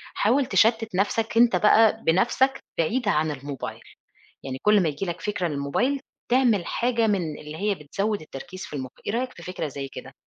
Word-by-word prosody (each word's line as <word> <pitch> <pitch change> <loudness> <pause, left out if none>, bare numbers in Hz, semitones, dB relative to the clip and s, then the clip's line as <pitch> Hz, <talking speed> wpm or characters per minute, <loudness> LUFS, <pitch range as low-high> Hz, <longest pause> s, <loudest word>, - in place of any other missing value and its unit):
حاول 260 +6 +2
تشتِّت 225 -4 +2
نَفْسك 225 +4 0
أنت 240 0 +6
بقى 220 +1 +4
بنَفْسك 240 +10 +3 0.2
بعيد 220 +9 0
عن 155 -5 +2
الموبايل. 130 -5 -6 0.6
يعني 130 -1 -5
كل 210 -1 +5
ما 165 - +2
ييجي 150 +6 -4
لك 175 -1 -4
فكرة 200 -4 -1
للموبايل، 155 - 0 0.3
تعمل 240 -7 +3
حاجة 235 -2 +1
من 175 -8 -1
اللي 150 +1 -8
هي 205 +2 0
بتزوِّد 200 +7 -2
التركيز 165 +5 -8
في - - -8
المُخ، 130 -2 -5 0.2
إيه - - -1
رأيك 250 +2 -2
في 175 - -11
فكرة 180 -3 -4
زي 140 -1 -6
كده؟ - - -10
200 Hz, 180 wpm, -25 LUFS, 150-225 Hz, 0.6 s, أنت